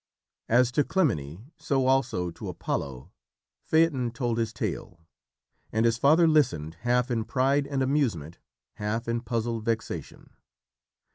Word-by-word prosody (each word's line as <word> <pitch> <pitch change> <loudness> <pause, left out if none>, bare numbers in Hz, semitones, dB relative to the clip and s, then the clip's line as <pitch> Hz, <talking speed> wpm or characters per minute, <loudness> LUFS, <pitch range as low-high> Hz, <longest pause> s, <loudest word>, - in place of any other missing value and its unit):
As 125 +1 +4
to 145 +4 +2
Clymene, 115 - -1
so 140 -4 0
also 120 -10 +1
to - - -7
Apollo, 70 +4 -4 0.5
Phaeton 160 -7 +2
told 120 0 -2
his 115 -1 -1
tale, 85 -5 -5 0.7
and 110 +1 +1
his 115 0 +2
father 160 +5 +5
listened, 85 - +2
half 125 +1 +1
in 115 -2 0
pride 135 +4 +1
and 140 -2 -1
amusement, 115 - -1 0.4
half 110 +3 -2
in 115 0 -1
puzzled 115 -2 -2
vexation. 115 0 -4
120 Hz, 130 wpm, -27 LUFS, 110-135 Hz, 0.7 s, father